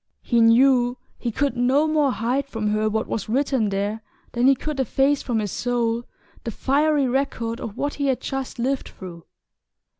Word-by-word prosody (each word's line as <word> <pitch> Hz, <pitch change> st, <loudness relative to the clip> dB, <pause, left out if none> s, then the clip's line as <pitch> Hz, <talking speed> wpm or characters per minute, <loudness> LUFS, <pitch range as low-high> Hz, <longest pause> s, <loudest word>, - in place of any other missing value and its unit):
He 235 Hz, -2 st, +2 dB
knew 245 Hz, +1 st, +4 dB, 0.2 s
he 240 Hz, -, -2 dB
could 280 Hz, +5 st, 0 dB
no 260 Hz, +5 st, +2 dB
more 305 Hz, -3 st, +2 dB
hide 250 Hz, +4 st, -1 dB
from 220 Hz, -5 st, -2 dB
her 215 Hz, +1 st, +1 dB
what 220 Hz, +1 st, -1 dB
was 215 Hz, -, -4 dB
written 260 Hz, -3 st, +1 dB
there 200 Hz, +3 st, -2 dB, 0.3 s
than 245 Hz, +1 st, +2 dB
he 275 Hz, -, +6 dB
could 300 Hz, +2 st, -5 dB
efface 270 Hz, +3 st, +2 dB
from 240 Hz, -3 st, -2 dB
his 210 Hz, -3 st, -2 dB
soul 240 Hz, -1 st, -1 dB, 0.4 s
the -, -, -3 dB
fiery 285 Hz, +4 st, +1 dB
record 240 Hz, -3 st, -2 dB
of 215 Hz, -, -6 dB
what 290 Hz, 0 st, -1 dB
he 285 Hz, -1 st, -2 dB
had 265 Hz, -2 st, +1 dB
just 270 Hz, -1 st, -4 dB
lived 260 Hz, +3 st, -1 dB
through. 175 Hz, -3 st, -11 dB
245 Hz, 180 wpm, -23 LUFS, 225-275 Hz, 0.4 s, he